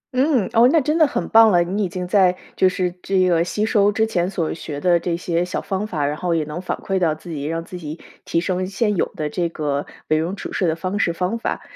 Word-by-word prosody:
嗯， 260 -6 +2
哦， 235 +2 +6
那 325 - +5
真 300 +2 0
的 315 - +6
很 280 - -3
棒 225 -1 +7
了。 175 -3 +4
你 195 +4 -2
已 190 - -1
经 180 +1 -4
在 185 -2 +4 0.2
就 185 - +4
是 180 -2 -2
这 190 -1 +2
个 170 -2 +3
吸 210 +4 -1
收 205 -2 +3
之 220 +2 +1
前 180 -5 -1
所 175 -5 -2
学 150 -3 -6
的 175 +2 +3
这 170 0 -2
些 170 0 -1
小 180 +1 -3
方 195 +2 -3
法， 150 -7 -2
然 145 +1 -1
后 175 0 -1
也 160 - +1
能 150 +4 -6
反 - - -3
馈 190 -1 -2
到 160 -4 +1
自 170 +2 -11
己， 145 -3 -4
让 165 +2 -3
自 180 - -8
己 155 0 -7 0.2
提 165 - 0
升 185 +1 -1
现 210 +2 0
有 - - 0
的 155 - -2
这 170 -2 -1
个， 145 -3 -2 0.2
为 155 - +3
人 170 +5 -2
处 - - -7
事 185 - 0
的 160 - +1
方 185 +4 -3
式 170 - +1
方 185 +7 -2
法。 - - -3
180 Hz, 285 characters per minute, -21 LUFS, 165-200 Hz, 0.2 s, 棒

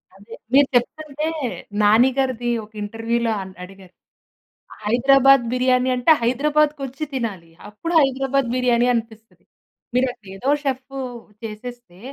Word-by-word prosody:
అదే. 205 +4 -12 0.2
మీరు 280 0 +6
చెప్తుంటే 300 +4 -1 0.5
'నాని' 220 +5 +5
గారిది 250 -3 -1 0.2
ఒక 215 - -25
ఇంటర్వ్‌లో 225 +2 -2
అన్ 190 0 -9
అడిగారు," 190 -1 -14 0.9
హైదరాబాద్ 270 +3 +5
బిర్యానీ 255 0 +2
అంటే 250 +6 +3
హైదరాబాద్‌కొచ్చి 290 +2 0
తినాలి, 200 -10 -4 0.2
అప్పుడు 330 +12 -5
హైదరాబాద్ 270 -1 0
బిర్యానీ 245 -1 +2
అనిపిస్తది. 225 -1 -6 0.5
మీరు 260 +1 +3
అక్కడ 210 - -28
అదేదో 250 +9 -1
చెఫు 270 0 -3 0.4
చేసేస్తే" 225 -3 -9
245 Hz, 115 wpm, -21 LUFS, 225-270 Hz, 0.9 s, మీరు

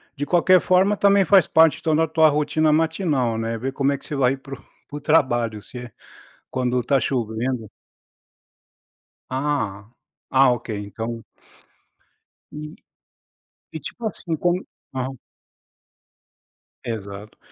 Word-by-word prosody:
de 145 - -3
qualquer 180 +3 +4
forma, 190 +3 +3
também 200 -1 +4
faz 190 +2 +5
parte, 160 -3 +4
então, 160 -1 +1
da 160 +1 +2
tua 160 0 +4
rotina 150 +1 +1
matinal, 155 - +1
né. 115 0 -2
Ver 130 +4 -3
como 135 0 +1
é 140 - -1
que - - -17
você 150 - -5
vai 135 -1 +2
para 135 +1 -11
o - - -21 0.3
para 145 - -5
o - - -8
trabalho, 120 -8 +1
se 125 - -11
é 120 -1 -8 0.6
quando 125 -1 0
tá 135 +2 +2
chovendo. 115 -1 -2 1.6
Ah, 130 -7 -2 0.4
ah, 135 0 +5
OK, 120 -1 -5
então 115 +3 -6 1.3
E 150 0 -8 1.0
e, 160 - -5
tipo 225 - -7
assim, 175 -5 -3
como 175 +3 0 0.3
aham. 130 0 -4 1.7
Exato. 105 -2 -7
135 Hz, 135 wpm, -22 LUFS, 120-160 Hz, 1.7 s, faz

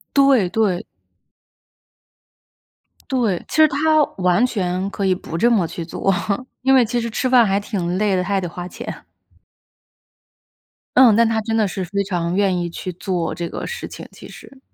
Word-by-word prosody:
对， 275 -8 +4
对。 195 -4 0 2.2
对， 230 -9 0
其 - - -6
实 315 - +7
她 310 +2 +2
完 180 +5 +3
全 185 -4 -2
可 200 0 -3
以 190 - +3
不 165 -2 -6
这 235 +7 +3
么 195 -8 +2
去 170 - -6
做， 195 +3 -1 0.5
因 265 +1 +3
为 255 -3 +5
其 240 +2 -1
实 230 - -3
吃 255 +3 -1
饭 245 -2 +6
还 195 0 +1
挺 185 -4 -3
累 205 -2 +1
的， 180 - 0
她 190 - -7
还 200 -1 +1
得 175 - -3
花 175 +1 -7
钱。 - - -8 1.9
嗯， 250 -5 +7
但 230 +1 +4
她 220 0 0
真 225 +1 -2
的 215 - +2
是 190 +1 -4
非 200 +3 -2
常 175 -2 -2
愿 195 -2 +2
意 175 0 -3
去 180 +2 -6
做 180 -2 -3
这 170 -1 -5
个 - - -6
事 480 - -6
情， - - -10
其 - - -13
实。 270 - -14
200 Hz, 195 characters per minute, -20 LUFS, 180-235 Hz, 2.2 s, 实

